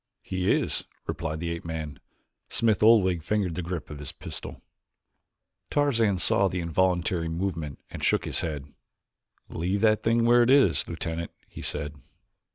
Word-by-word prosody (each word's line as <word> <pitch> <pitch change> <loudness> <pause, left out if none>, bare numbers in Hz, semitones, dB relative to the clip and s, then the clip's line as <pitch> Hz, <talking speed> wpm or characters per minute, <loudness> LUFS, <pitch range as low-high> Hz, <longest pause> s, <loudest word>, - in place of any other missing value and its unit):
"He 95 0 0
is," - - 0 0.2
replied 80 -1 -3
the 85 -1 -2
ape 85 0 -4
man. 80 -4 -5 0.5
Smith 110 -4 +2
Oldwick 100 -6 +5
fingered 95 0 0
the 90 - -3
grip 85 -3 -5
of 75 - -7
his 70 -2 -4
pistol. - - -8 1.1
Tarzan 115 -9 +2
saw 100 +2 +3
the 90 0 -2
involuntary 85 0 +1
movement 80 -4 -3
and - - -7
shook - - +2
his - - 0
head. 75 -4 -3 0.8
"Leave 95 +5 -1
that 110 -1 +4
thing 115 +1 +2
where 120 +1 +6
it 120 - +3
is, 140 0 +4
Lieutenant," 85 0 -4 0.2
he - - -10
said. 75 0 -4
90 Hz, 155 wpm, -27 LUFS, 80-105 Hz, 1.1 s, where